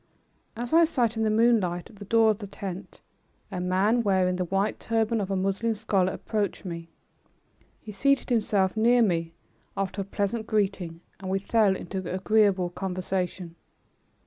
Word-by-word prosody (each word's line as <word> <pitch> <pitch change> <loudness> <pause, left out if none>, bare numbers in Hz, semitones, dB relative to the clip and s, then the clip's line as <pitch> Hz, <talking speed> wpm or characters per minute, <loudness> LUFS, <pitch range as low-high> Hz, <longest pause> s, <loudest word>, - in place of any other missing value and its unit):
As 240 +3 -5
I 335 +1 +7
sat 245 -8 +1
in 225 - -2
the 220 - +2
moonlight 215 -6 +2
at 210 - -17
the 205 - -9
door 225 +2 +4
of 210 - -4
the 205 - -7
tent, 195 -1 -8 0.5
a 185 -2 -3
man 190 +6 +2
wearing 190 -4 +2
the 180 - -1
white 195 +4 -1
turban 225 0 0
of 195 - -3
a 195 - 0
Moslem 195 +4 0
scholar 195 -3 +1
approached 210 -1 -3
me. 170 -2 -6 0.9
He 215 - -9
seated 275 +8 +1
himself 205 -4 +1
near 235 +2 +4
me 165 -4 -1 0.4
after 195 0 -2
a - - -2
pleasant 205 +3 -2
greeting 190 -6 -1 0.2
and 190 -1 -6
we 190 - +1
fell 200 0 +2
into 190 +1 -5
agreeable 190 -1 +2
conversation. 185 -1 -3
200 Hz, 165 wpm, -26 LUFS, 185-220 Hz, 0.9 s, I